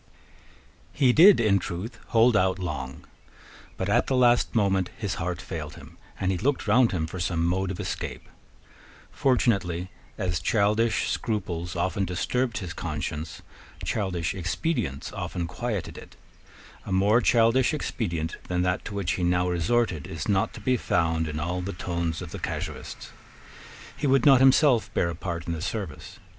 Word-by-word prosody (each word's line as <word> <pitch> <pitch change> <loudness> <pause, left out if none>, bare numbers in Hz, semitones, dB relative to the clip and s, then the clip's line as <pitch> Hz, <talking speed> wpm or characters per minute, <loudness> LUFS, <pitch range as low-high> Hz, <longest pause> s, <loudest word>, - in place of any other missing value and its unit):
He 130 -3 +4
did 185 +7 +8
in 105 -4 +3
truth 90 +6 -6
hold 115 +1 +4
out 95 -3 +2
long. 75 -8 -5 0.7
But - - -2
at - - +2
the 135 - +1
last 120 -1 +3
moment 95 -4 +2
his 105 -4 -2
heart 85 0 -2
failed 75 -2 -6
him, - - -13 0.2
and 95 0 +1
he 90 - -2
looked 140 +5 0
round 125 -2 +4
him 85 -4 -1
for 90 +3 -7
some 85 -2 0
mode 95 +2 0
of 95 - -5
escape. - - -5 0.8
Fortunately, 95 -9 +1 0.3
as 90 -3 -1
childish 110 +6 +2
scruples 90 -6 -3
often 95 +4 0
disturbed 120 +7 -1
his 90 -3 -5
conscience, 80 0 -5 0.4
childish 90 -6 -1
expedients 90 - -2
often 90 -3 -3
quieted 105 +3 -4
it. - - -14 0.7
A - - -7
more 100 +5 +4
childish 120 +2 +4
expedient 85 - -3
than 90 0 0
that 90 0 0
to 105 - -6
which 95 -3 -1
he 90 - -2
now 90 +1 +2
resorted 90 -1 0
is 80 -3 -5
not 95 -2 +1
to - - -8
be 130 -1 +2
found 80 -5 0
in 75 0 -4
all 90 +3 -2
the 100 +3 -4
tones 85 -1 -3
of 85 - -9
the - - -6
casuists. - - -5 0.8
He 145 - -1
would 135 -2 +3
not 135 -3 +7
himself 135 -2 +4
bear 85 - +1
a - - -6
part 85 -1 -5
in 85 - -2
the 80 - -5
service. - - -5
95 Hz, 165 wpm, -26 LUFS, 85-115 Hz, 0.8 s, did